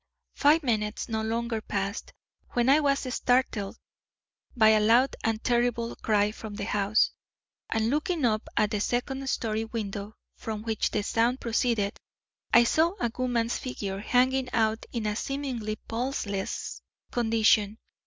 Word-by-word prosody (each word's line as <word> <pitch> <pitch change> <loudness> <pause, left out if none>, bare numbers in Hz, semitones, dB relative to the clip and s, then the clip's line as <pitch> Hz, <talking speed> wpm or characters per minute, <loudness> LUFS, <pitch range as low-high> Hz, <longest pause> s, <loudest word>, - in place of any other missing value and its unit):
"Five 300 +3 +4
minutes, 215 -4 -1
no 220 -1 -1
longer, 225 0 -2
passed, 200 0 -3 0.4
when 240 +1 +2
I 285 +3 +6
was 280 -2 +2
startled 245 -5 0 0.8
by 220 -2 +6
a 215 0 +5
loud 235 +5 +4
and 225 0 -1
terrible 240 -1 +1
cry 210 -1 +2
from 215 -1 -8
the 200 - -4
house, 205 -1 +2 0.6
and 225 +1 +1
looking 305 0 0
up 215 -2 0
at 210 0 +3
the 210 - 0
second 265 +5 -2
story 220 -3 -1
window 215 -2 -5 0.2
from 215 -1 -5
which 225 -2 0
the - - -1
sound 235 +4 +1
proceeded, 230 -3 0 0.5
I 235 - +7
saw 325 +9 +2
a 235 - 0
woman's 245 -2 0
figure 200 -6 -4
hanging 255 +4 +2
out 220 -1 +1
in 230 -3 -3
a 210 0 0
seemingly 250 -5 -3
pulseless 225 -5 -3 0.3
condition. 220 -3 +2
225 Hz, 145 wpm, -27 LUFS, 215-250 Hz, 0.8 s, I